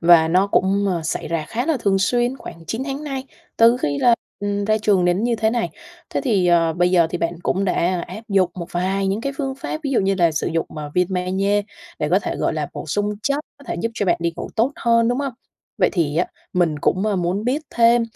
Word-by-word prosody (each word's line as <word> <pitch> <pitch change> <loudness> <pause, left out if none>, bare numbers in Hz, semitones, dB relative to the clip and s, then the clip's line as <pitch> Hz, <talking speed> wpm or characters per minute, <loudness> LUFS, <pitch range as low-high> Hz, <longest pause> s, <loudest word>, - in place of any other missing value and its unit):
và 165 -1 +6
nó 185 +4 +3
cũng, 200 +1 +2
ờ, 175 -3 0
xảy 155 - -3
ra 165 -2 -1
khá 240 +4 -2
là 320 -4 +2
thường 195 -2 +2
xuyên 240 +6 +1
khoảng 165 -7 -10
9 225 +8 -3
tháng 280 +2 -4
nay, 270 -2 -4 0.3
từ 230 +2 +6
khi 145 - -1
là, 240 -1 +5 0.3
ừm, 205 0 -1
ra 215 +1 +2
trường 200 -4 +2
đến 180 +5 +2
như 240 -1 +1
thế 220 0 +1
này. 235 0 -1 0.4
Thế - - -1
thì, 205 -9 +2
ờ, 170 -2 +4
bây 175 +2 +2
giờ 170 -3 +4
thì 175 - -2
bạn 170 +1 -1
cũng 195 +2 0
đã, 185 - +1
a, 180 +1 +1
áp 190 +5 -8
dụng 190 -3 +3
một 175 -2 -6
vài 190 +2 0
những 195 +3 0
cái 275 +3 -2
phương 270 -2 -2
pháp 275 +3 -5
ví 275 - -1
dụ 255 - +3
như 195 0 +1
là 170 -3 +3
sử 155 - -1
dụng, 165 0 -1
à, 150 -1 -5
viên 180 -1 +3
Ma-giê 190 +3 +1 0.4
để - - -1
có - - +5
thể, - - -4
gọi - - 0
là, - - -2
bổ - - -7
sung 205 0 0
chất, 280 +4 +1 0.2
có 280 - -16
thể - - -1
giúp 230 - -1
cho 205 - -1
bạn 175 - +3
đi 170 0 0
ngủ - - -5
tốt 240 +6 +2
hơn, 230 0 +3
đúng 245 +2 0
hông? 275 -2 -2 0.5
Vậy - - +4
thì 155 -5 0
á, 175 - +2 0.3
mình 170 -4 +1
cũng, 185 +7 +1
a, 205 - +1
muốn 180 +4 -1
biết 270 +6 0
thêm 235 0 +4
195 Hz, 260 wpm, -21 LUFS, 175-230 Hz, 0.5 s, và